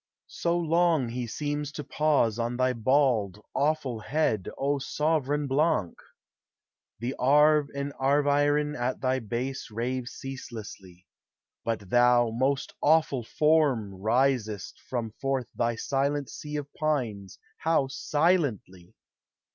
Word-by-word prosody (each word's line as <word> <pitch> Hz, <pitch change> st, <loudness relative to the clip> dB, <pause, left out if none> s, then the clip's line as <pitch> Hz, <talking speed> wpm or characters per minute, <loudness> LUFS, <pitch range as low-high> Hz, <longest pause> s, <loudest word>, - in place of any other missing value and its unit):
So 170 Hz, 0 st, -1 dB
long 165 Hz, -5 st, +2 dB
he 120 Hz, 0 st, -4 dB
seems 145 Hz, +3 st, -3 dB
to 150 Hz, -, -5 dB
pause 140 Hz, -7 st, +1 dB
On 120 Hz, +1 st, -1 dB
thy 130 Hz, 0 st, +2 dB
bald, 115 Hz, -5 st, +2 dB
awful 140 Hz, -5 st, 0 dB
head, 110 Hz, -, 0 dB
O 140 Hz, +1 st, 0 dB
sovran 150 Hz, 0 st, 0 dB
Blanc! 140 Hz, -, +1 dB, 1.0 s
The 120 Hz, +4 st, -3 dB
Arve 150 Hz, +2 st, +4 dB
and 140 Hz, 0 st, -3 dB
Arveiron 145 Hz, +2 st, +2 dB
at 125 Hz, 0 st, -2 dB
thy 130 Hz, 0 st, 0 dB
base 125 Hz, +4 st, -4 dB
Rave 120 Hz, +3 st, -3 dB
ceaselessly; 110 Hz, -9 st, -9 dB, 0.6 s
but 105 Hz, -5 st, -3 dB
thou, 120 Hz, -1 st, +4 dB
most 135 Hz, +4 st, -1 dB
awful 150 Hz, -5 st, +3 dB
Form, 140 Hz, -7 st, +2 dB
Risest 110 Hz, 0 st, 0 dB
from 120 Hz, -3 st, -2 dB
forth 135 Hz, -2 st, 0 dB
thy 115 Hz, 0 st, 0 dB
silent 140 Hz, +3 st, -1 dB
sea 150 Hz, 0 st, -7 dB
of 145 Hz, -1 st, -5 dB
pines 120 Hz, -, -2 dB, 0.2 s
How 160 Hz, -4 st, +2 dB
silently 135 Hz, -, -1 dB
135 Hz, 115 wpm, -27 LUFS, 115-150 Hz, 1.0 s, Arve